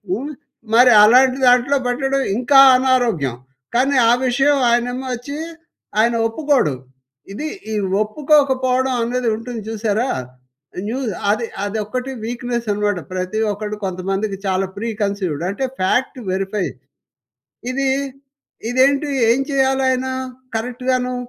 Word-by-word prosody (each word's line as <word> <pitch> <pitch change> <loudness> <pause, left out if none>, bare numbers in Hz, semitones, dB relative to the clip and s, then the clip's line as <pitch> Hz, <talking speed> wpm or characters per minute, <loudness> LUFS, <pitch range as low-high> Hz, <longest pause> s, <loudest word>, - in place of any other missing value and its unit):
హ్మ్. 280 +8 -5 0.4
మరి 245 +2 +7
అలాంటి 255 +4 +5
దాంట్లో 250 +3 +4
పెట్టడం 270 +2 0 0.2
ఇంకా 255 +3 +3 0.2
అనారోగ్యం. 235 - +1 0.4
కానీ 270 +3 +2
ఆ - - +6
విషయం 275 +3 +2
ఆయనేమో 245 +2 -1
వచ్చి 280 +5 -7 0.6
ఆయన 235 +1 +3
ఒప్పుకోడు. 260 - +1 0.6
ఇది 295 +10 -5 0.3
ఈ - - -1 0.3
ఒప్పుకోకపోవడం 260 0 +1
అనేది 245 +1 -2
ఉంటుంది 230 -1 -6
చూసారా! 220 +3 -1 0.8
న్యూ 250 +4 -3 0.3
అది 215 +3 +1 0.2
అదొక్కటి 220 +5 -3
వీక్‌నెసనమాట. 230 -4 -2 0.2
ప్రతి 185 +3 -3
ఒక్కడు 210 +1 -5
కొంతమందికి 195 +2 -3
చాలా 190 0 +1
ప్రీ 230 +3 -3
కన్సీవ్‌డ్ 190 -7 -2
అంటే 200 +7 -4 0.2
ఫాక్ట్ 245 +9 0
వెరిఫై. 195 +1 -2 1.1
ఇది 270 +1 -1 0.8
ఇదేంటి? 275 +3 +2 0.2
ఏం 255 - 0
చేయాలాయనా 265 -1 +1 0.4
కరెక్ట్‌ 245 +2 -5
గాను 250 0 0
245 Hz, 110 wpm, -19 LUFS, 210-265 Hz, 1.1 s, మరి